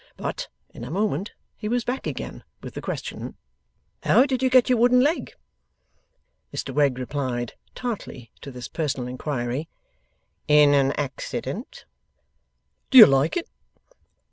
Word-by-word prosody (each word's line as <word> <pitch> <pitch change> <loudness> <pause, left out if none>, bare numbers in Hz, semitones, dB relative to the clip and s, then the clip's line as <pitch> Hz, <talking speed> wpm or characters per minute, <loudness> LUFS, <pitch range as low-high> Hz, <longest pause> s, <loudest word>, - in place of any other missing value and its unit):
But, - - -4 0.3
in - - -9
a 120 - -6
moment 195 +1 -1 0.2
he 215 - -5
was 245 0 0
back 255 +3 -3
again - - -6 0.2
with - - -8
the - - -6
question: - - -5 0.7
'How 260 - +5
did 260 -3 -1
you 260 - +3
get 255 -1 +5
your 250 -3 +2
wooden 250 +1 +5
leg?' 300 +6 0 1.2
Mr 135 - -5
Wegg 140 -2 +2
replied, 130 -2 -3 0.2
(tartly 185 - -6
to - - -8
this 125 -2 -8
personal 140 -6 -3
inquiry), 130 +2 -3 0.8
'In 150 -1 +6
an 135 -1 +3
accident.' 195 - -5 1.0
'Do 265 - +5
you 225 - +14
like 135 - +2
it? 340 - -3
150 Hz, 140 wpm, -24 LUFS, -, 1.2 s, you